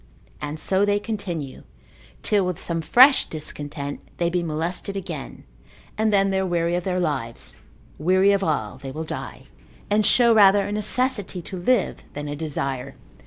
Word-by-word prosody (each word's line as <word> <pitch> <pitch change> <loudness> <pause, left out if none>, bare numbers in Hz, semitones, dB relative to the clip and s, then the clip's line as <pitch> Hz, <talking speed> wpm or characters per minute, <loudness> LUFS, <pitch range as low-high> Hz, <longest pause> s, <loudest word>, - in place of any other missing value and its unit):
And 150 +1 -5
so 190 +4 +2
they 205 0 +2
continue, 180 -10 -5 0.6
till 205 -2 +2
with 180 -1 -2
some 165 -3 +1
fresh 260 - +6
discontent 145 -2 -6 0.2
they 170 0 0
be 180 0 0
molested 170 +5 -2
again, 170 -7 -7 0.5
and 220 0 +1
then 195 -1 +3
they 190 - +1
are - - 0
weary 170 -1 0
of 175 - -2
their 185 -1 -1
lives, 135 -9 -3 0.4
weary 185 +5 +4
of 200 -1 +1
all, 130 - -2
they 135 -1 -7
will 155 +4 -5
die, 160 - -6 0.5
and 210 +1 +3
show 235 +2 +5
rather 200 -2 +6
a - - -4
necessity 210 -1 0
to 190 - -7
live, 200 +5 0
than 145 0 -5
a 145 - -4
desire. 140 -4 -4
180 Hz, 165 wpm, -23 LUFS, 155-200 Hz, 0.6 s, fresh